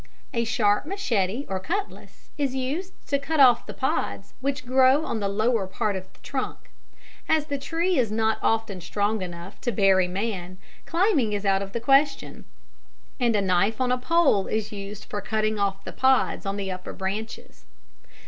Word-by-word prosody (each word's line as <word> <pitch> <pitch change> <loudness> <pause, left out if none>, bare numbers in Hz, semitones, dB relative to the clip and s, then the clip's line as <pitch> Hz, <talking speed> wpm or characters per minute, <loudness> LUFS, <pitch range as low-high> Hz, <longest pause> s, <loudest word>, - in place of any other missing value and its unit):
A 235 -2 0
sharp 225 +1 +2
machete 245 - -1
or 190 -1 -2
cutlass 395 - -5
is 275 -3 -1
used 285 +9 -2
to 280 0 0
cut 305 +2 -2
off 250 -4 +6
the - - -5
pods - - -2
which 270 -1 -2
grow 260 +4 +4
on 230 - -2
the 200 - -1
lower 215 0 +1
part 210 +1 -1
of 185 0 -7
the - - -26
trunk. - - -5 0.6
As 315 -2 +3
the 285 -2 -3
tree 335 +4 0
is 230 -4 +1
not 220 0 +1
often 225 -4 0
strong 205 +4 -1
enough 175 +1 -8
to 245 - -1
bear 195 -4 +4
a 180 - +1
man, 185 -1 -4 0.3
climbing 330 - +2
is 205 0 -2
out 195 0 +3
of 195 0 -5
the 235 - -1
question, 275 +4 +2 0.7
and 240 -3 +2
a 205 - +3
knife 195 +4 +2
on 255 -1 +1
a 250 - +2
pole 280 - +3
is 215 0 -2
used 205 0 -7
for 205 - -5
cutting 215 -1 -1
off 195 -1 -1
the - - -6
pods 260 -5 +2
on 195 +1 -2
the 195 -1 -3
upper 185 0 -6
branches. 190 - -5
220 Hz, 185 wpm, -25 LUFS, 195-265 Hz, 0.7 s, off